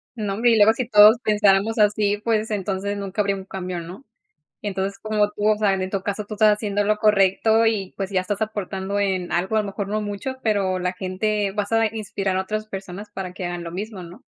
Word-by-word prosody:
Nombre, 220 +2 +1
y - - +5
luego, 215 +1 +6
si 240 0 -3
todos 210 0 +7
pensáramos 210 +1 +3
así, 210 0 +2
pues, 220 -1 0
entonces 200 0 -2
nunca 200 +1 -2
habría 200 -1 0
un 190 - -8
cambio, 185 -2 -5
¿no? 180 +10 -10 0.6
Entonces, 195 -1 -3
como 210 -1 0
tú, 210 0 -1
o 215 - +4
sea, 205 -2 +2
en 190 - -2
en 185 - -4
caso 205 +2 -3
tú 215 - -7
estás 215 0 +5
haciendo 205 -1 -1
lo 210 +1 +1
correcto 210 +2 +3
y, 210 -4 0
pues, 195 0 -4
ya 190 - +1
estás 205 +3 -4
aportando 200 -2 -3
en 190 -3 -1
algo, 185 +5 0
a 220 - +4
lo 205 - -6
mejor, 200 0 -4
no 215 +1 -1
mucho, 205 +5 -4
pero 195 -4 +1
la 180 0 -1
gente 195 +2 -2
vas 205 +1 -3
a 225 0 +3
inspirar 200 -3 -2
a 190 - +1
otras 215 +3 -4
personas 195 0 -7
para 185 -2 -5
que 185 -1 -5
hagan 175 0 -4
lo 170 - -6
mismo, 200 +1 -6
¿no? 175 +1 -12
205 Hz, 225 wpm, -22 LUFS, 190-215 Hz, 0.6 s, todos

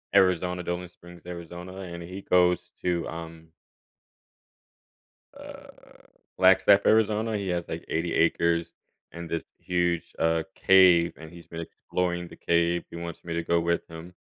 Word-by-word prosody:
Arizons 90 -2 +3
Dolan 90 0 -3
Springs, 85 0 -15
Arizona, 90 +1 -8
and 85 -2 -7
he 90 +3 -8
goes 90 -2 +2
to, 85 -2 -1
um 80 0 -9 1.9
uh, - - -11 0.7
Flagstaff, 95 +2 +5
Arizona. 110 0 +2
He 100 -2 -3
has, 85 -1 -2
like, - - -5
80 85 +1 -1
acres 85 0 +1 0.4
and 85 0 -7
this 85 0 -3
huge, 85 -1 -1
uh, 80 0 +1
cave, 90 -3 +5
and 80 0 -11
he's 85 0 -13
been 85 - -7
exploring 85 +1 -3
the - - -13
cave, 85 0 +1
he - - -8
wants 85 0 -7
me 85 - -5
to 85 - -1
go 85 +1 +1
with 85 0 -1
him 85 +2 -10
85 Hz, 145 wpm, -27 LUFS, 85-90 Hz, 1.9 s, Flagstaff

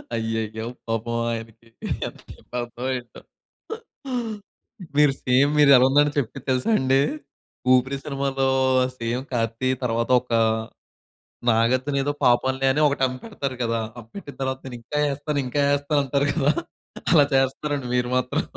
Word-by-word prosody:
అయ్యయ్యో! 110 -1 -3 0.2
పాపం 115 +1 -2
ఆయనకి 115 0 -7 0.4
ఎంతకి - - -12 0.2
అర్ధం 120 +1 -6
అయిందో. 125 -2 -6 1.8
మీరు 150 -2 +5
సేమ్ 130 +3 +3
మీరెలా 140 -2 +8
ఉందంటే 145 +1 +3
చెప్పింది 135 +1 -5
తెలుసా 130 - +1
అండి? 130 +1 +3 0.7
ఊపిరి 130 +2 +2
సినిమాలో 135 -2 -1 0.5
సేమ్ 115 +2 -2
'కార్తీ' 115 +2 0
తరువాత 115 -1 0
ఒక 125 - -17 1.2
నాగార్జునేదో 130 +5 +1
పాపంలే 130 +2 +2
అని 150 - +1
ఒకటి 140 -1 -1
అమ్మి 130 0 -6
పెడతారు 140 - -4
కదా! 115 -1 0 0.2
అమ్మి 115 0 -14
పెట్టిన 145 -8 -9
తర్వాత 130 0 -2
నేనింకా 125 +4 -5
ఏస్తాను, 145 +1 -2
ఇంకా 145 +3 -1
ఏస్తాను 145 +1 0
అంటారు 140 +2 +1
కదా! 150 -1 +2 0.6
అలా 145 -3 +7
చేస్తున్నారండి 135 +1 0
మీరు 125 0 0
మాత్రం. 130 - -1
130 Hz, 125 wpm, -24 LUFS, 120-140 Hz, 1.8 s, మీరెలా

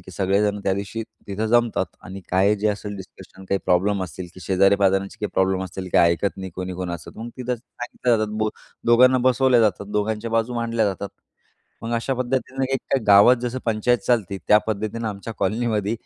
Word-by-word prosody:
की 90 - -13
सगळेजण 100 +2 +1
त्यादिवशी 100 +3 -2 0.2
तिथं 105 +2 -2
जमतात 120 0 +1
आणि 95 +2 -8
काय 95 +3 +3
जे 105 +1 0
असेल 105 0 -4
डिस्कशन, 95 0 -12
काही 100 +1 0
प्रॉब्लेम 95 +2 +2
असतील 90 +1 -8
की 95 - -12
शेजारी 100 +1 +4
पाजारचे 95 0 +1
काही 105 - -2
प्रॉब्लेम 95 0 +1
असतील. 95 +1 -7
काही 85 0 +5
ऐकत 100 +4 -2
नाही 95 -1 -6
कोणी-कोणच. 90 -2 -5
मग 115 +2 -6
तिथं 125 0 -2
सांगितल्या 120 0 -2
जातात. 110 0 -1 0.4
दोघांना 125 +2 +6
बसवल्या 130 -1 +4
जातात. 100 -2 +1
दोघांच्या 105 +2 -1
बाजू 115 +2 0
मांडल्या 115 -1 0
जातात. 100 +1 -3 0.7
मग 115 +1 -4
अशा 115 +3 -1
पद्धतीनं 130 +1 -2
एक 135 - +2
काय 135 - +1
गावात 105 +5 +7
जसं 125 +1 -2
पंचायत 115 +2 +1
चालते. 105 -6 +1
त्या 105 - +7
पद्धतीनं 110 +1 -2
आमच्या 105 +2 -6
कॉलनीमध्ये 110 -2 0
105 Hz, 175 wpm, -22 LUFS, 95-115 Hz, 0.7 s, गावात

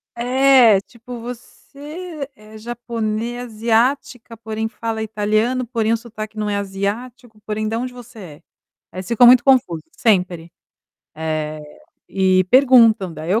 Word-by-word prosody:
É, 250 -3 +4
tipo, 235 +3 -11
você 285 +6 -9
é 215 +1 -16
japone 230 0 -4
asiática, 235 +1 -1
porém 220 0 -4
fala 225 0 -5
italiano, 220 +4 -1
porém 225 -2 -1
o 230 - +2
sotaque 215 -2 -9
não 210 -1 -2
é 205 - -1
asiático, 210 +4 -5
porém 215 0 -2
"Da 225 +1 -2
onde 250 +1 -4
você 245 -2 -13
é?" 180 -7 -10 0.6
Aí 180 - -11
eles 185 - -9
ficam 240 +1 +5
muito 245 0 +7
confuso, 245 - +2 0.2
sempre. 180 -8 0 0.6
Eh, 155 -1 -4 0.5
e 185 -1 +2
perguntam, 235 -8 +5
daí 155 +2 -6
eu 215 +4 +2
225 Hz, 140 wpm, -19 LUFS, 210-245 Hz, 0.6 s, muito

